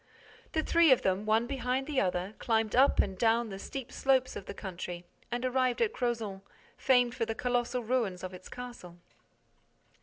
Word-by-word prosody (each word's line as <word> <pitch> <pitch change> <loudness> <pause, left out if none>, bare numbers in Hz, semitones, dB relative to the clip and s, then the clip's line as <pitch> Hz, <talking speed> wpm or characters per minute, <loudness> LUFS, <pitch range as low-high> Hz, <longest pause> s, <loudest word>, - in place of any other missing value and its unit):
The 315 - +1
three 335 -2 +5
of 260 - +5
them, 190 +3 0
one 220 +2 +3
behind 260 0 -1
the 290 -2 0
other, 180 +1 -1
climbed 225 -2 +1
up 270 +3 +5
and 195 -2 +2
down 230 +3 +2
the 195 -1 -7
steep 265 +3 -6
slopes 260 -1 +1
of 190 - -7
the - - -5
country 175 -2 -6 0.3
and 240 +1 -2
arrived 255 -1 +1
at 450 -2 +1
Crozant, 225 -6 -2 0.3
famed 245 -2 +3
for 230 -2 -2
the 225 - -2
colossal 245 +1 -1
ruins 220 -7 -1
of 185 0 -5
its 185 0 -11
castle. 240 -9 -9
240 Hz, 180 wpm, -30 LUFS, 195-255 Hz, 0.3 s, three